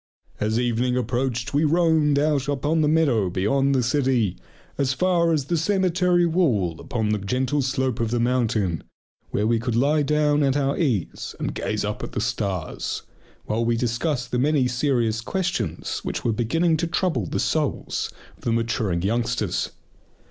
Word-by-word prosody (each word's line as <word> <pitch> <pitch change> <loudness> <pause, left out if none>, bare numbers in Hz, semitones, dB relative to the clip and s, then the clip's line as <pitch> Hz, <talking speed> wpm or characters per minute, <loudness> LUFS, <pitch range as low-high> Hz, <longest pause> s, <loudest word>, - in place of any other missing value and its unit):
As 110 +2 0
evening 125 +1 +1
approached 125 +2 -1
we 145 +2 +3
roamed 160 -2 +3
out 145 -2 +1
upon 145 +3 +1
the 150 - +3
meadow 140 - +2
beyond 135 +10 +1
the 130 - +2
city, 125 -7 +1 0.4
as 135 -1 +1
far 170 +2 +2
as 150 -4 +1
the 170 +4 0
cemetery 180 0 +2
wall 120 - +1
upon 110 -3 -2
the 105 0 +1
gentle 130 +8 0
slope 130 -2 -1
of 115 -1 0
the 120 +1 0
mountain, 115 - 0 0.5
where 105 - 0
we 115 +1 +2
could 115 0 -2
lie 145 +5 +3
down 150 0 +2
at 140 -1 +2
our 140 -1 +1
ease 125 - -2
and - - -2
gaze 105 -1 -2
up 105 0 -3
at - - -6
the - - -2
stars, 100 -7 -2 0.4
while 110 +2 0
we 115 0 +1
discussed 125 +3 -1
the 125 - 0
many 140 -1 +2
serious 120 -3 0
questions 180 +7 -2
which - - -5
were 115 - +2
beginning 160 +9 +1
to 170 - -1
trouble 165 - 0
the - - -2
souls - - -1 0.3
of - - -23
the 115 - 0
maturing 115 -6 0
youngsters. 115 -2 0
125 Hz, 170 wpm, -24 LUFS, 115-150 Hz, 0.5 s, we